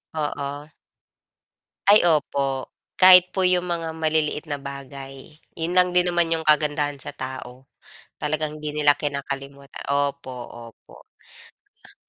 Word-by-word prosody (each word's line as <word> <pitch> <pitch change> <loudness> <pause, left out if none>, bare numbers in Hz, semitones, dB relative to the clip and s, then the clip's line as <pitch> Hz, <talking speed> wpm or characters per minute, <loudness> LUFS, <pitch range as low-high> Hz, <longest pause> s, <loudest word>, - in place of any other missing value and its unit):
Oo. 145 0 -4 1.2
Ay, 205 -3 +7
opo, 140 -4 0 0.3
kahit 185 -1 +8
po 190 - -1
'yong 180 -1 +3
mga 170 -2 -3
maliliit 155 -1 0
na 145 -1 -3
bagay, 140 +1 -9 0.2
'yon 165 +1 -2
lang 180 0 +4
din 180 0 +4
naman 175 -1 +1
'yong 160 -1 -3
kagandahan 145 -1 +1
sa - - -6
tao. 130 0 -8 0.5
Talagang 155 0 -2
hindi 150 0 -5
nila 145 -1 +4
kinakalimuta 140 -1 -5
opo, 140 -1 -1 0.4
opo. - - -18 0.9
Ah - - -20
150 Hz, 125 wpm, -23 LUFS, 140-165 Hz, 1.2 s, kahit